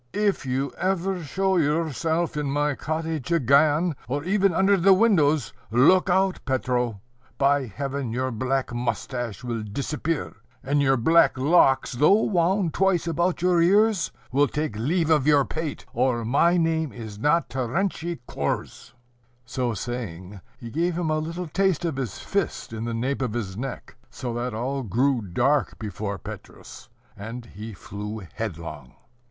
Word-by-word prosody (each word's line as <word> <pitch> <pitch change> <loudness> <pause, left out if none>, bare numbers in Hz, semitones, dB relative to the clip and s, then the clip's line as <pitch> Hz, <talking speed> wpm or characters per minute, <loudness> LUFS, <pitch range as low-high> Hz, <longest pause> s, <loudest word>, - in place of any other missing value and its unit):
"If 200 -10 0
you 130 +1 -1
ever 190 0 0
show 190 +4 0
yourself 160 +1 0
in 150 -2 -2
my 145 +1 +1
cottage 160 0 -3
again, 155 +2 +3
or 145 +3 -2
even 195 +2 +2
under 190 +4 +3
the 190 +1 +5
windows, 155 - +3 0.2
look 150 - +4
out, 190 +1 +2
Petro! 125 -5 -1 0.4
by 140 -1 +2
Heaven, 135 +2 -4
your 130 +2 -1
black 130 +2 -1
moustache 120 -2 -3
will 120 -2 -3
disappear; 145 +8 -3 0.3
and 145 +2 +1
your 135 -1 +3
black 160 +5 +4
locks, 135 -1 +4
though 155 - +4
wound 180 -2 +1
twice 190 -3 +2
about 170 +1 0
your 180 -2 +4
ears, 205 +2 +3 0.2
will 140 +3 +3
take 150 -5 -3
leave 160 - 0
of 150 -3 +3
your 145 -2 +5
pate, 160 -1 -5
or 120 -1 +1
my 170 +9 +3
name 160 -3 +1
is 110 -3 -9
not 160 +7 +2
Terentiy 165 +4 -2
Korzh." 70 - -4 0.5
So 125 -2 -2
saying, 100 -5 -6 0.2
he 115 -1 -9
gave 170 +4 0
him 170 -3 -1
a 155 - +1
little 165 +3 -4
taste 185 0 +1
of 160 -5 -2
his 125 -8 -3
fist - - -3
in 110 +1 -4
the 120 - -3
nape 130 +4 -1
of 125 -5 -1
his 100 -6 -4
neck, 125 +1 -6
so 120 -2 -5
that 120 -1 -3
all 135 +4 -2
grew 125 +4 +1
dark 120 +9 0
before 100 -1 -4
Petrus, - - -11 0.3
and 115 +4 -7
he 110 0 -9
flew 105 +3 -7
headlong. 80 - -6
140 Hz, 155 wpm, -25 LUFS, 120-170 Hz, 0.5 s, the